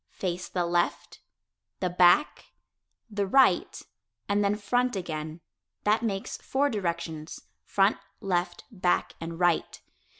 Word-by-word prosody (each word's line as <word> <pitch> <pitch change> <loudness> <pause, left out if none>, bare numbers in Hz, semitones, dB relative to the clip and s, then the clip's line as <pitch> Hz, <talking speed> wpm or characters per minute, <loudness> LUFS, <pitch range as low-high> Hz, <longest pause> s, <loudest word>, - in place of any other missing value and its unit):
Face 180 -1 -3
the 180 -2 -1
"left," 175 0 -1 0.6
the 185 - 0
"back," 180 - +4 0.6
the 205 -3 -2
"right," 250 -5 +3 0.4
and 205 0 +2
then 200 +1 +2
"front" 245 +4 0
again. 160 -3 -5 0.4
That 215 +2 +3
makes 200 -4 -3
four 285 +2 0
directions 170 -6 -4 0.2
front, 195 +1 +2 0.2
left, 175 -2 -1
back 180 -4 0
and 165 0 -6
right. 175 -2 +1
185 Hz, 120 wpm, -28 LUFS, 175-210 Hz, 0.6 s, back